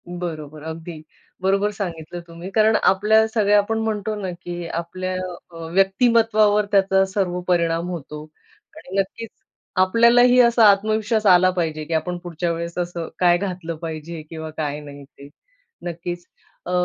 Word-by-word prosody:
बरोबर, 155 -4 -6
अगदी. 160 0 -7 0.4
बरोबर 195 +2 +1
सांगितलं 175 -4 -6
तुम्ही, 170 +2 -9
कारण 220 +2 +3
आपल्या 215 +3 +4
सगळ्या 210 -2 +3
आपण 205 +2 +1
म्हणतो 215 -1 -2
ना 190 - -3
की 175 0 -6
आपल्या 185 +3 -4 0.4
अ, - - -15 0.2
व्यक्तिमत्वावर 210 +1 +3
त्याचा 195 -1 +4
सर्व 185 -2 -1
परिणाम 170 -1 +1
होतो 150 -3 -7 0.5
आणि 190 +2 -4
नक्कीच 220 +4 -3 0.5
आपल्यालाही 235 +5 +5
असा 235 -1 +4
आत्मविश्वास 215 +2 +1
आला 185 -1 +6
पाहिजे 160 -4 -2
की 165 - -5
आपण 175 +3 -1
पुढच्या 175 0 -2
वेळेस 170 +1 -5
असं 175 -2 -3
काय 175 -1 +4
घातलं 180 -3 -4
पाहिजे 160 0 -6
किंवा 160 -1 -6
काय 150 -2 -2
नाही 145 -1 -11
ते, 140 0 -15 0.5
नक्कीच. 175 0 -5 0.4
अ, 180 - -4
180 Hz, 140 wpm, -22 LUFS, 165-205 Hz, 0.5 s, आला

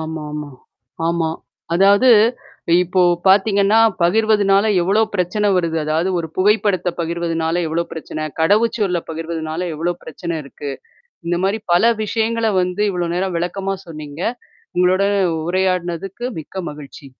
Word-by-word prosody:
ஆமாமா. 150 -2 -5 0.6
ஆமா. 165 -1 0 0.4
அதாவது 200 +7 +5 0.7
இப்போ 180 +1 0 0.3
பார்த்தீங்கன்னா, 200 +2 +4 0.2
பகிர்வதுனால 205 +1 +3 0.2
எவ்ளோ 195 +5 +2
பிரச்சனை 200 +3 0
வருது. 170 -2 0
அதாவது 160 +4 0
ஒரு 160 -1 -4
புகைப்படத்த 200 -2 +2
பகிர்வதுனால 170 0 -1
எவ்ளோ 165 +2 0
பிரச்சனை, 155 -1 -6 0.2
கடவுச்சொல்ல 205 0 +2
பகிர்வதுனால 160 0 -4
எவ்ளோ 170 +3 -1
பிரச்சனை 170 +1 -5
இருக்கு. 140 +1 -7 0.6
இந்த 175 0 0
மாரி 200 +3 0
பல 230 +7 +4
விஷயங்கள 225 +1 0
வந்து 180 +3 -2
இவ்வளோ 175 -2 -2
நேரம் 185 -1 -1
விளக்கமா 195 +3 -2
சொன்னீங்க. 150 -1 -8 0.5
உங்களோட 185 +2 +3 0.4
உரையாடினதுக்கு 185 +3 -1
மிக்க 185 +4 -7
மகிழ்ச்சி. 145 -1 -11
180 Hz, 115 wpm, -19 LUFS, 165-200 Hz, 0.7 s, அதாவது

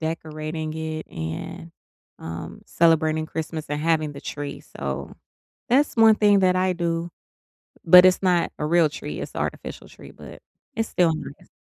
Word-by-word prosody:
decorating 155 0 -4
it, 160 0 -5
and, 80 - -6 0.5
um, 80 +1 -8
celebrating 160 -1 +2
Christmas 160 0 -5
and 150 0 -2
having 155 -2 +1
the 140 - -10
tree, 145 -1 -6
so 70 0 -6 0.6
that's 280 +4 +3
1 225 -2 +6
thing 205 -2 +4
that 185 -1 +3
I 185 0 +1
do, 170 -1 -2 0.8
but 180 +2 +9
it's 185 0 +4
not 180 -2 +2
a 150 - -1
real 165 0 +3
tree. - - -7
It's - - -7
artificial - - -5
tree, - - -14
but - - -13 0.3
it's 225 -1 -2
still 170 -2 +2
nice. - - -10
160 Hz, 155 wpm, -23 LUFS, 155-180 Hz, 0.8 s, but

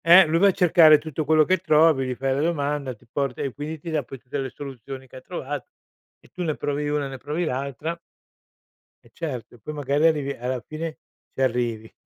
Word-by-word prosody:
Eh, 175 +3 +9
lui 165 +1 +1
va 200 - +6
a - - +6
cercare 165 -4 +7
tutto 155 0 -4
quello 155 +1 +5
che 185 +3 +3
trovi, 155 -6 +4
gli 125 - -2
fai 135 +1 0
la 140 - 0
domanda, 145 -5 -1
ti 120 - -24
porta 130 +1 -2
e 135 - -3
quindi 155 +2 -5
ti 165 +3 -6
dà 155 -2 0
poi 135 +2 -9
tutte 130 +3 -5
le 135 -1 -2
soluzioni 135 0 -8
che 130 - -12
ha - - -10
trovato 145 -3 -5 0.5
e - - -22
tu 180 - -6
ne 160 -4 0
provi 145 0 -2
una 145 -1 0
e - - -3
ne 135 - -7
provi 150 +6 -2
l'altra. 140 +4 -3 1.1
Eh, - - -20
certo, 135 -9 -5
e - - -19
poi 150 +9 -7
magari 145 +1 +1
arrivi 150 -4 +1
alla 125 -1 -3
fine 155 +1 -5 0.4
ci - - -4
arrivi. 120 -3 0
145 Hz, 225 wpm, -24 LUFS, 130-160 Hz, 1.1 s, Eh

